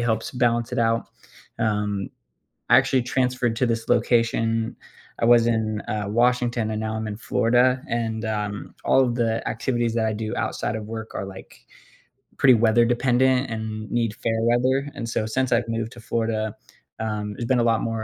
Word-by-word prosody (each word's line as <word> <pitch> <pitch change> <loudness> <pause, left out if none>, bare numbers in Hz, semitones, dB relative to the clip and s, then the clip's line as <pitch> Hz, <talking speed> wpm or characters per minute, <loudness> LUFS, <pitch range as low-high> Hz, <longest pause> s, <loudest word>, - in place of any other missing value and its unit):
helps 115 -2 -1
balance 120 -2 +1
it - - -1
out, 115 0 +1 0.5
um 105 -3 -1 0.6
I - - +7
actually 130 -2 +2
transferred 125 -2 0
to 125 - +2
this 115 -1 -2
location. 115 -1 +1 0.5
I - - +3
was 120 0 +5
in, 110 -2 0
uh, 105 -1 -2
Washington, 120 -1 +1
and 110 0 -2
now 110 0 -3
I'm 110 0 -3
in 105 - -4
Florida, 125 +3 +2
and, 115 -1 -2
um, 105 -1 -4
all - - +4
of 120 -2 -1
the 115 -2 -1
activities 120 0 -1
that 115 - +1
I 110 - +1
do 110 0 -4
outside 105 - -2
of 110 -1 -5
work 110 0 -7
are, - - -3
like, 95 -1 -12 0.7
pretty 130 -2 +6
weather 115 +1 +4
dependent 125 +2 +2
and 110 -1 -5
need 115 -3 0
fair 115 -1 -1
weather, 130 +4 +2
and 115 -5 -5
so, 110 - -1
since 130 +3 -1
I've 120 0 +2
moved 115 0 -2
to 120 - -12
Florida, 110 -1 -2 0.4
um, 105 -1 -3
there's 120 - -5
been 125 +1 +2
a - - +3
lot 115 -1 +2
more 115 -1 -2
115 Hz, 185 wpm, -24 LUFS, 110-120 Hz, 0.7 s, I